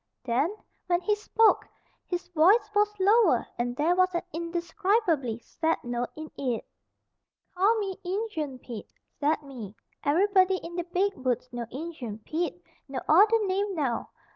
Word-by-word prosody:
Then, 265 Hz, -, 0 dB, 0.3 s
when 350 Hz, -1 st, +3 dB
he 420 Hz, -, +2 dB
spoke, 430 Hz, +1 st, +3 dB, 0.4 s
his 355 Hz, 0 st, -3 dB
voice 390 Hz, +6 st, +4 dB
was 420 Hz, 0 st, +2 dB
lower 395 Hz, -, +4 dB
and 245 Hz, 0 st, -1 dB
there 320 Hz, +6 st, +2 dB
was 370 Hz, 0 st, +3 dB
an 345 Hz, -, 0 dB
indescribably 340 Hz, -, 0 dB
sad 320 Hz, +7 st, -1 dB
note 240 Hz, 0 st, -2 dB
in 310 Hz, 0 st, -8 dB
it. 250 Hz, -5 st, -1 dB, 0.9 s
"Call 400 Hz, +5 st, +3 dB
me 395 Hz, -3 st, -3 dB
'Injun 355 Hz, -, -3 dB
Pete', 235 Hz, -4 st, -9 dB, 0.2 s
zat 300 Hz, +1 st, +1 dB
me. 235 Hz, -8 st, -9 dB, 0.3 s
Everybody 375 Hz, +4 st, +4 dB
in 340 Hz, -1 st, -8 dB
de 350 Hz, -1 st, -2 dB
beeg 375 Hz, +3 st, +1 dB
Woods 250 Hz, -1 st, -2 dB
know 240 Hz, -1 st, -4 dB
Injun 265 Hz, -6 st, -6 dB
Pete. 310 Hz, -, -3 dB, 0.2 s
No 270 Hz, -2 st, -4 dB
odder 420 Hz, +6 st, +5 dB
name 390 Hz, +1 st, 0 dB
now. 265 Hz, -7 st, -1 dB
340 Hz, 145 wpm, -28 LUFS, 260-390 Hz, 0.9 s, odder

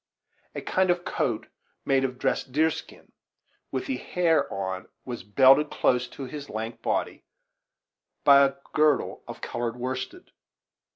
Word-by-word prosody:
A -, -, -3 dB
kind 185 Hz, 0 st, +1 dB
of 175 Hz, 0 st, +1 dB
coat, 115 Hz, -4 st, -1 dB, 0.4 s
made 135 Hz, -1 st, +3 dB
of 130 Hz, -1 st, -2 dB
dressed 135 Hz, -1 st, -1 dB
deer 160 Hz, +4 st, +3 dB
skin, -, -, -10 dB, 0.6 s
with 130 Hz, -, -2 dB
the 130 Hz, -, -2 dB
hair 170 Hz, +3 st, +1 dB
on, 95 Hz, -1 st, -4 dB, 0.2 s
was 120 Hz, -2 st, -5 dB
belted 135 Hz, +8 st, +5 dB
close 125 Hz, -1 st, +1 dB
to 135 Hz, -, -9 dB
his 145 Hz, +2 st, -8 dB
lank 110 Hz, +2 st, -5 dB
body -, -, -2 dB, 1.0 s
by 140 Hz, -1 st, +8 dB
a 135 Hz, 0 st, +2 dB, 0.2 s
girdle 150 Hz, -3 st, +2 dB
of -, -, -8 dB
colored 120 Hz, -1 st, -3 dB
worsted. 130 Hz, -, -5 dB
135 Hz, 140 wpm, -26 LUFS, 125-150 Hz, 1.0 s, by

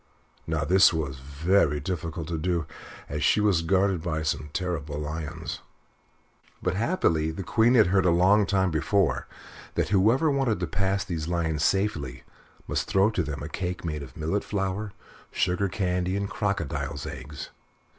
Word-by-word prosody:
Now 80 Hz, -2 st, 0 dB
this 95 Hz, +4 st, +6 dB
was 75 Hz, -5 st, -3 dB
very 75 Hz, +3 st, +1 dB
difficult 80 Hz, 0 st, -4 dB
to 80 Hz, -2 st, -2 dB
do, 85 Hz, -1 st, 0 dB, 0.4 s
as -, -, -3 dB
she -, -, +4 dB
was 100 Hz, -5 st, +3 dB
guarded 95 Hz, +1 st, +2 dB
by 80 Hz, -2 st, -2 dB
some 75 Hz, -1 st, -2 dB
terrible 75 Hz, -5 st, -3 dB
lions; 75 Hz, 0 st, -5 dB, 1.0 s
but -, -, -1 dB
happily 95 Hz, -, +1 dB
the 80 Hz, +5 st, -5 dB
Queen 115 Hz, +7 st, +3 dB
had 110 Hz, -4 st, +7 dB
heard 95 Hz, 0 st, +3 dB
a -, -, +5 dB
long 95 Hz, +4 st, +4 dB
time 95 Hz, -2 st, +2 dB
before 90 Hz, +4 st, +1 dB, 0.5 s
that -, -, 0 dB
whoever 115 Hz, -, +4 dB
wanted 135 Hz, -8 st, +1 dB
to 90 Hz, -, 0 dB
pass 100 Hz, +2 st, 0 dB
these 80 Hz, -3 st, -3 dB
lions 80 Hz, -3 st, 0 dB
safely 75 Hz, -11 st, 0 dB, 0.4 s
must -, -, -1 dB
throw 95 Hz, +3 st, +3 dB
to 100 Hz, -, 0 dB
them 75 Hz, -3 st, -4 dB
a -, -, -4 dB
cake 90 Hz, +2 st, -4 dB
made 75 Hz, -3 st, -3 dB
of 65 Hz, -2 st, -10 dB
millet 80 Hz, +6 st, -1 dB
flour, 100 Hz, +1 st, -2 dB, 0.4 s
sugar 95 Hz, +2 st, 0 dB
candy, 90 Hz, 0 st, -1 dB
and 100 Hz, 0 st, -3 dB
crocodile's 100 Hz, -8 st, -2 dB
eggs. 70 Hz, +3 st, -7 dB
90 Hz, 160 wpm, -26 LUFS, 80-100 Hz, 1.0 s, had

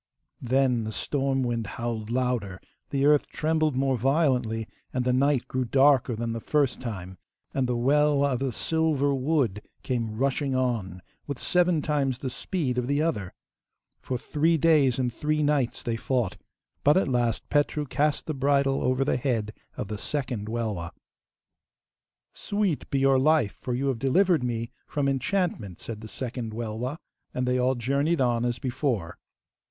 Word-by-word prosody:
Then 125 Hz, -1 st, +2 dB
the 110 Hz, -, -4 dB
storm 135 Hz, +2 st, 0 dB
wind 115 Hz, -3 st, -1 dB
howled 115 Hz, -2 st, -3 dB
louder, 120 Hz, -6 st, -1 dB, 0.3 s
the 140 Hz, 0 st, +1 dB
earth 150 Hz, 0 st, +4 dB
trembled 155 Hz, -2 st, 0 dB
more 135 Hz, -1 st, +1 dB
violently, 125 Hz, -5 st, +1 dB, 0.2 s
and 125 Hz, -1 st, -1 dB
the 125 Hz, -, +2 dB
night 135 Hz, 0 st, +2 dB
grew 130 Hz, 0 st, -1 dB
darker, 135 Hz, -1 st, +4 dB
than 115 Hz, +1 st, -3 dB
the 115 Hz, -, -3 dB
first 140 Hz, +1 st, 0 dB
time, 95 Hz, -6 st, -6 dB, 0.3 s
and 135 Hz, -2 st, 0 dB
the 125 Hz, -1 st, 0 dB
Welwa 140 Hz, +2 st, +3 dB
of 125 Hz, -, -1 dB
the 135 Hz, -1 st, -1 dB
silver 150 Hz, +1 st, +1 dB
wood 130 Hz, -7 st, 0 dB, 0.2 s
came 115 Hz, -4 st, -2 dB
rushing 135 Hz, +1 st, 0 dB
on 110 Hz, -8 st, -1 dB, 0.2 s
with 140 Hz, -3 st, -3 dB
seven 175 Hz, -2 st, +2 dB
times 140 Hz, -4 st, 0 dB
the 130 Hz, 0 st, -4 dB
speed 135 Hz, -5 st, -2 dB
of 125 Hz, -, -2 dB
the 140 Hz, +1 st, +1 dB
other. 145 Hz, -, -1 dB, 0.6 s
For 130 Hz, -, -3 dB
three 160 Hz, +6 st, +1 dB
days 145 Hz, -5 st, +4 dB
and 125 Hz, -2 st, -1 dB
three 150 Hz, +4 st, 0 dB
nights 145 Hz, -4 st, +1 dB
they 115 Hz, -1 st, -1 dB
fought, 120 Hz, -6 st, -1 dB, 0.5 s
but 145 Hz, +4 st, +5 dB
at 190 Hz, -, +2 dB
last 120 Hz, -3 st, 0 dB
Petru 145 Hz, 0 st, +1 dB
cast 150 Hz, +2 st, 0 dB
the 155 Hz, -, -2 dB
bridle 140 Hz, 0 st, +2 dB
over 130 Hz, +1 st, +1 dB
the 135 Hz, -, +1 dB
head 115 Hz, -5 st, -1 dB, 0.2 s
of -, -, -3 dB
the 105 Hz, 0 st, -5 dB
second 125 Hz, -8 st, -3 dB
Welwa. 110 Hz, -7 st, -2 dB, 1.4 s
'Sweet 205 Hz, -7 st, -1 dB
be 140 Hz, -, 0 dB
your 135 Hz, -1 st, +4 dB
life, 145 Hz, -6 st, +3 dB
for 125 Hz, -, -4 dB
you 135 Hz, +3 st, -1 dB
have 125 Hz, -4 st, -2 dB
delivered 165 Hz, -, +3 dB
me 115 Hz, -1 st, -2 dB, 0.2 s
from 145 Hz, -2 st, -1 dB
enchantment,' 135 Hz, -, -1 dB
said 110 Hz, -2 st, -7 dB
the 110 Hz, -, -8 dB
second 120 Hz, -1 st, -5 dB
Welwa, 120 Hz, +5 st, -3 dB, 0.4 s
and 125 Hz, 0 st, -1 dB
they 125 Hz, 0 st, +2 dB
all 130 Hz, +1 st, +2 dB
journeyed 140 Hz, +7 st, 0 dB
on 120 Hz, -2 st, +2 dB
as 120 Hz, -1 st, -1 dB
before. 120 Hz, -, -2 dB
130 Hz, 165 wpm, -26 LUFS, 115-145 Hz, 1.4 s, but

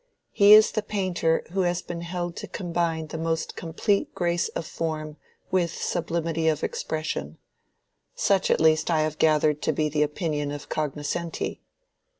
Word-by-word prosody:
He 205 Hz, +1 st, +7 dB
is 215 Hz, +1 st, +8 dB
the 215 Hz, -, -1 dB
painter 185 Hz, -6 st, 0 dB
who 195 Hz, -, -2 dB
has 175 Hz, 0 st, 0 dB
been 170 Hz, -1 st, -6 dB
held 175 Hz, 0 st, -4 dB
to -, -, -6 dB
combine 170 Hz, -3 st, -2 dB
the 160 Hz, +1 st, -6 dB
most 165 Hz, 0 st, -2 dB
complete 190 Hz, +5 st, -1 dB
grace 175 Hz, -1 st, 0 dB
of 165 Hz, -, -5 dB
form 155 Hz, -2 st, -4 dB, 0.3 s
with 180 Hz, -2 st, +2 dB
sublimity 165 Hz, -1 st, -1 dB
of 155 Hz, -1 st, +1 dB
expression. 155 Hz, -, -3 dB, 0.8 s
Such 195 Hz, -1 st, +2 dB
at -, -, +3 dB
least 155 Hz, 0 st, +3 dB
I 160 Hz, -2 st, +3 dB
have 155 Hz, 0 st, -2 dB
gathered 150 Hz, -1 st, +3 dB
to -, -, +1 dB
be 155 Hz, 0 st, 0 dB
the 150 Hz, 0 st, 0 dB
opinion 150 Hz, -1 st, -1 dB
of 145 Hz, 0 st, -7 dB
cognoscenti." 155 Hz, +3 st, -3 dB
165 Hz, 155 wpm, -26 LUFS, 155-175 Hz, 0.8 s, is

